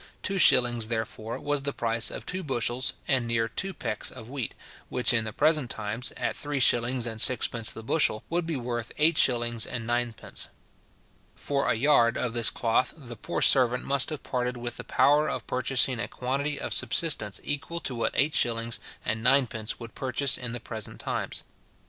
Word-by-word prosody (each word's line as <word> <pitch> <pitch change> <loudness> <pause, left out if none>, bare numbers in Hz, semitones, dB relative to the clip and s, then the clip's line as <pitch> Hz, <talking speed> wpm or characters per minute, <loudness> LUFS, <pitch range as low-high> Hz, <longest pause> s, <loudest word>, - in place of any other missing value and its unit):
Two 195 -1 -1
shillings, 120 -7 +5
therefore, 110 0 -4
was 145 -1 -1
the 140 0 -3
price 115 0 +1
of - - -7
two 185 +1 -3
bushels 130 -4 -1
and 130 -4 +1
near 115 -1 0
two 190 - -3
pecks 105 - -2
of 110 - -11
wheat, 130 -2 -5 0.3
which 125 0 +3
in 115 -2 +1
the 110 - -5
present 150 +1 +2
times, 110 +3 -3
at - - -2
three 145 -1 -3
shillings 120 0 +3
and 110 -2 -3
sixpence 120 -2 +4
the 110 - -8
bushel, 115 -3 +2
would 170 0 -2
be 165 - -2
worth 120 -2 -4
eight 155 +2 +4
shillings 120 -5 +2
and 115 +1 -4
ninepence. 120 -1 -2 0.9
For 140 -1 -2
a - - +2
yard 120 -2 +3
of 125 -2 -2
this 115 -2 +4
cloth 115 +1 0
the 125 -6 -10
poor - - -3
servant 125 -2 +4
must 140 0 +1
have 155 -3 -6
parted 125 -1 -2
with 120 0 -5
the - - -6
power 150 +2 +3
of - - -4
purchasing 130 -1 +2
a - - -2
quantity 140 +3 -2
of - - -2
subsistence 120 - +1
equal 160 +4 -2
to 130 - -2
what 115 - -2
eight 145 +3 +2
shillings 115 -1 0 0.3
and 110 0 -2
ninepence 120 -3 +2
would 115 -2 -9
purchase 130 +1 +1
in 125 -2 -4
the 120 - -4
present 110 -2 -5
times. - - -3
120 Hz, 185 wpm, -27 LUFS, 115-140 Hz, 0.9 s, shillings